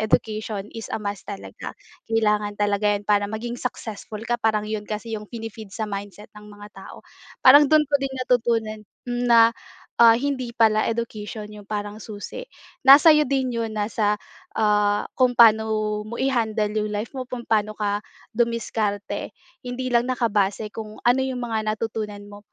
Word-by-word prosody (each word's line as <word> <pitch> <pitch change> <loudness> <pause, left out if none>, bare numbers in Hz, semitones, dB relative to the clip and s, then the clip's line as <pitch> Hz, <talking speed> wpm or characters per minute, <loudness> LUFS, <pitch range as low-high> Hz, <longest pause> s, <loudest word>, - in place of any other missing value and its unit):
Education 215 -1 -1
is 225 -1 -7
a - - 0
must. 200 -1 -5
talaga. 200 -1 -8 0.3
Kailangan 210 -2 +1
talaga 205 0 +1
'yon 200 - -7
para 205 -1 +2
maging 235 +3 -5
successful 220 -3 -6
ka, 240 0 -1
parang 215 -2 +1
'yon 215 -1 -3
kasi 220 +2 -5
'yong 210 -1 -5
pini-feed 225 -2 -8
sa 220 - -2
mindset 200 0 -7
ng 210 - -14
mga 205 0 -12
tao. 195 - -12 0.4
Parang 285 +3 +9
dun 310 -1 +5
ko 290 - -2
din 275 -1 -3
natutunan 225 -3 0 0.2
na, 240 -2 +4 0.5
ah, 230 -1 +8
hindi 255 -1 -2
pala 220 -2 +3
education 215 -2 -4
yung 210 -1 -12
parang 205 0 -4
susi, 215 - -7 0.4
nasa 280 +4 +9
iyo 300 - +4
din 265 -1 0
yun 230 -2 -2
nasa, 210 0 0 0.4
ah, 210 -1 +2
kung 255 -1 +3
paano 220 -2 +4
mo 230 - -7
i-handle 225 -5 0
yung 210 0 -1
life 210 +2 -3
mo, 260 -1 -5
kung 250 -1 -6
paano 215 -1 +1
ka 205 -1 -1 0.3
dumiskarte. 225 -3 -2 0.3
Hindi 255 +1 -3
lang 240 0 +2
nakabase 215 -4 0
kung 215 0 -8
ano 245 +2 +3
'yong 260 -1 -3
mga 220 -2 -2
natutunan 215 -2 -4
mo, 205 - -11
220 Hz, 165 wpm, -23 LUFS, 210-240 Hz, 0.5 s, Parang